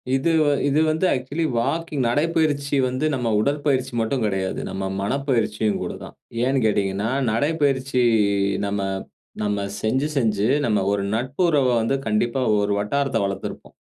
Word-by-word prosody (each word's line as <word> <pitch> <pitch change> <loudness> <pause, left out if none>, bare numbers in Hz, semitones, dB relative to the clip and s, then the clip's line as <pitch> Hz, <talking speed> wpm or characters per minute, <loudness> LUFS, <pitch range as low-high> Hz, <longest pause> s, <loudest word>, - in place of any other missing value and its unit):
இது 135 +5 +1
வ - - 0 0.2
இது 145 +2 +2
வந்து 160 +4 0
ஆக்சுவலி 135 +6 -3
வாக்கிங் 150 +2 -1
நடைப்பயிற்சி 145 +1 +1
வந்து 130 +4 -1
நம்ம 125 -2 -2
உடற்பயிற்சி 140 +1 0
மட்டும் 115 +2 0
கிடையாது. 95 -2 -2
நம்ம 95 - -4 0.2
மனப்பயிற்சியும் 110 -3 0
கூட - - -3
தான். - - -11 0.3
ஏன்னு 135 +2 +2
கேட்டீங்கன்னா, 100 0 0 0.2
நடைப்பயிற்சி 135 0 +1 0.6
நம்ம 100 0 -2 0.6
நம்ம 105 -1 0 0.2
செஞ்சு 130 +7 +1
செஞ்சு 110 -4 +1 0.2
நம்ம 105 -4 +2
ஒரு 100 -1 0
நட்பு 130 +8 -3
உறவ 145 -5 +3
வந்து 115 +5 +1
கண்டிப்பா 115 +4 0 0.2
ஒரு 100 0 0
வட்டாரத்த 135 +5 0
வளர்த்திருப்போம். 100 0 -6
130 Hz, 140 wpm, -22 LUFS, 105-140 Hz, 0.6 s, உறவ